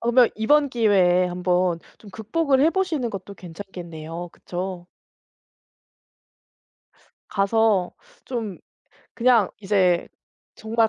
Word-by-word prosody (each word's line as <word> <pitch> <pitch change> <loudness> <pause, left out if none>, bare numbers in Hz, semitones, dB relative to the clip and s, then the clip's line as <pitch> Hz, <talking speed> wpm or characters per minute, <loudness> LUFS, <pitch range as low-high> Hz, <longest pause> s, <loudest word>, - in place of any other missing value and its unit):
그러면 240 0 +4
이번 285 +7 +3
기회에 190 -7 +3
한번 180 -1 0 0.2
좀 205 - -14
극복을 265 - 0
해 315 +3 +5
보시는 330 -10 -1
것도 200 -1 -7
괜찮겠네요. 170 -2 -8
그쵸? 180 0 -6 2.4
가서 200 -2 +2 0.3
좀 225 -8 -4 0.6
그냥 235 -4 +3
이제 190 -4 +2 0.5
정말 225 +1 +1
200 Hz, 200 characters per minute, -23 LUFS, 180-235 Hz, 2.4 s, 해